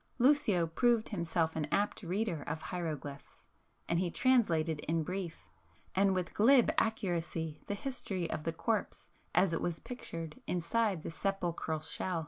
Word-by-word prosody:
Lucio 240 - +4
proved 230 +7 +2
himself 170 -4 0
an 155 -2 0
apt 205 +2 +1
reader 185 -2 -1
of 150 +2 -4
hieroglyphs, 155 -5 -5 0.4
and 170 - +2
he 180 -1 +1
translated 170 - +3
in 165 +1 +1
brief, 180 -1 -5 0.5
and 195 0 +3
with 180 -1 -2
glib 245 +3 +6
accuracy 170 -7 -1
the 205 - -1
history 200 -7 -2
of 155 - -3
the 165 - 0
corpse 215 +7 -2 0.2
as 190 -3 +4
it 165 - 0
was 170 -2 -1
pictured 170 -4 -7
inside 180 +1 0
the - - -4
sepulchral 175 -3 -1
shell. 170 +2 -2
175 Hz, 145 wpm, -33 LUFS, 165-210 Hz, 0.5 s, glib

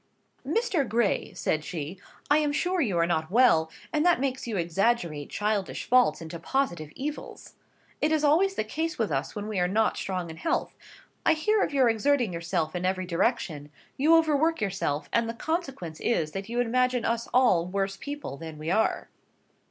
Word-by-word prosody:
"Mr. 390 - 0
Gray," 230 -2 +1
said 155 0 -1
she, 165 +3 -6 0.3
"I 295 +1 +4
am 300 -1 +1
sure 360 +4 0
you 205 - 0
are 170 - +3
not 160 -2 -1
well; 200 -8 +4 0.2
and 300 0 +2
that 350 -4 +4
makes 260 -2 -2
you 220 -4 -2
exaggerate 170 -3 0
childish 205 -2 -1
faults 245 -11 +3
into 165 +1 -7
positive 175 - -1
evils. 295 +3 -6 0.5
It 305 - +2
is 310 -1 +2
always 355 +7 +3
the - - 0
case 320 +9 -3
with 220 -7 -1
us 135 -1 -2
when 210 0 -4
we 215 -3 -2
are 180 - +2
not 215 +4 +1
strong 180 -3 -3
in 160 - -10
health. 330 - -1 0.5
I 320 - +5
hear 415 +7 +1
of - - 0
your 270 -3 +4
exerting 235 -1 +2
yourself 165 -1 -2
in 180 - -2
every 185 0 0
direction: 170 - -1 0.3
you 310 +5 +5
overwork 320 0 +3
yourself, 190 -8 -2
and 230 -1 +2
the 230 - -4
consequence 270 - -4
is, 160 -10 0
that 195 +4 -6
you 240 +1 -2
imagine 250 0 +1
us 230 0 -1
all 215 -10 +4
worse 195 +1 -1
people 285 - -6
than 160 -1 -8
we 155 +2 -3
are." 220 +3 +1
225 Hz, 185 wpm, -27 LUFS, 170-285 Hz, 0.5 s, I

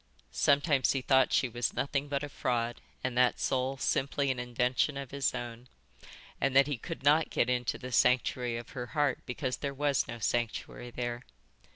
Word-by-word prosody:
Sometimes 140 - +3
he 135 -2 -2
thought 130 0 +4
she 130 - +3
was 120 0 -2
nothing 140 0 -1
but 140 0 -2
a 145 - -4
fraud, 120 -3 -2 0.2
and 130 -1 -2
that 125 0 +3
soul 130 +1 0
simply 140 +1 0
an 125 - -3
invention 125 +3 0
of 140 -2 -6
his 140 -1 0
own, 120 0 -6 0.7
and 135 -1 +1
that 135 0 +7
he 145 -5 -3
could 165 -1 -7
not 150 +3 +4
get 125 - +1
into 125 -1 -1
the 130 0 -8
sanctuary 125 -1 +2
of 120 - -8
her 125 -3 -6
heart 145 -3 +2
because 130 0 -2
there 140 -1 -4
was 145 -1 +1
no 120 - -6
sanctuary 120 +1 -2
there. 120 0 -4
130 Hz, 185 wpm, -31 LUFS, 120-140 Hz, 0.7 s, that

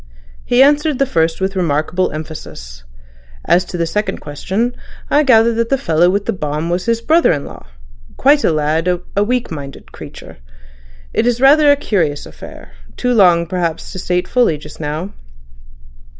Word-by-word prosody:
He 245 +2 +4
answered 295 0 +2
the 275 - +2
first 165 -7 0
with 190 +1 -2
remarkable 175 +1 0
emphasis. 150 - -9 0.6
As 180 - +3
to 180 - -6
the 170 - 0
second 210 +6 -2
question, 195 +11 -3 0.4
I 295 - +4
gather 235 -4 +4
that 230 0 -1
the 275 - +2
fellow 170 -5 +2
with 200 +2 -1
the - - -1
bomb 155 -1 -3
was 180 +1 -2
his 230 0 0
brother 325 +6 +3
in 145 -4 -2
law—quite - - -2
a - - +3
lad—a 165 +6 -1
weak 245 0 -2
minded 140 -4 -9
creature.... - - -12 0.8
It 235 - +1
is 245 -1 +1
rather 290 +3 +6
a - - +5
curious 170 - -1
affair—too - - -7
long 175 -6 +4
perhaps 170 -2 -3
to 185 - -7
state 180 0 -1
fully 245 -11 +2
just 150 +1 -13
now." 160 +5 -4
180 Hz, 160 wpm, -16 LUFS, 155-235 Hz, 0.8 s, rather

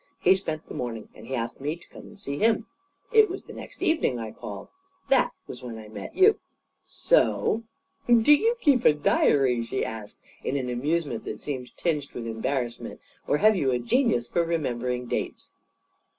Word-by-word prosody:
He 185 - +6
spent 160 -5 -4
the - - -8
morning, 115 -3 -5
and 110 - -13
he 130 - -2
asked 115 +1 -4
me 150 +3 -1
to 170 - -18
come - - -11
and 210 - -15
see 140 -7 -4
him. 225 0 +3 0.5
It 440 -1 +7
was 375 +2 -5
the - - -11
next - - -9
evening 315 - +2
I 110 -2 -5
called. 100 -1 -8 0.4
That 270 -2 +4 0.2
was 125 - -9
when 120 -2 -7
I 110 -1 -10
met 110 - -8
you. 410 +3 +5 0.4
So 230 - +2 0.2
" 280 - -39 0.2
"Do 295 - +8
you 450 +11 +3
keep 275 - +3
a - - +6
diary?" 135 -4 +3
she 115 - -2
asked, 110 -2 -7 0.3
in 140 - -1
an 130 -2 -2
amusement 145 0 -1
that - - -5
seemed 130 -4 -6
tinged 150 -5 -1
with 120 - -5
embarrassment. 120 +2 -3 0.3
"Or - - +3
have 215 +5 +5
you 145 -8 +1
a 125 - +2
genius 125 - +1
for 170 +7 +1
remembering 125 -7 -2
dates?" - - -4
140 Hz, 190 wpm, -26 LUFS, -, 0.5 s, Do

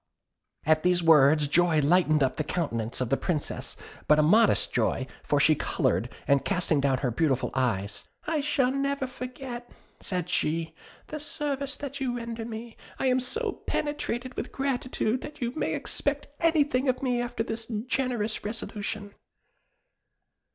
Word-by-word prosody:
"At 155 +1 +4
these 180 0 +2
words 150 -2 +6
joy 165 +1 +3
lighted 155 -1 +4
up 130 -1 0
the 155 - 0
countenance 125 -9 -2
of 125 - -1
the 135 - +4
Princess, 160 -5 -3 0.3
but 150 - +6
a 155 - +5
modest 215 +8 +4
joy, - - +1 0.2
for - - +1
she - - +6
coloured, - - 0 0.2
and 140 -1 +4
casting 175 -6 +1
down 135 -1 +2
her 125 - +1
beautiful 135 0 +1
eyes, 105 -6 -1 0.2
'I 310 -1 0
shall 275 -3 +2
never 275 0 0
forget,' 250 -1 -7 0.3
said 180 -3 -3
she, 165 -2 0 0.3
'the 305 - -6
service 280 -1 -1
that 280 -1 -6
you 245 -2 -1
render 230 -1 -5
me; 230 0 -7 0.2
I - - -1
am 255 0 +3
so 425 - -2
penetrated 255 -4 -2
with - - -4
gratitude, 255 -3 -1
that 300 0 -9
you 240 -1 -1
may - - -1
expect 285 0 -2
anything 290 -5 +2
of 255 +1 0
me 245 -2 +1
after 240 -1 -2
this 225 0 -4 0.2
generous 245 -5 -1
resolution.' 205 -1 -4
225 Hz, 155 wpm, -27 LUFS, 155-265 Hz, 0.3 s, words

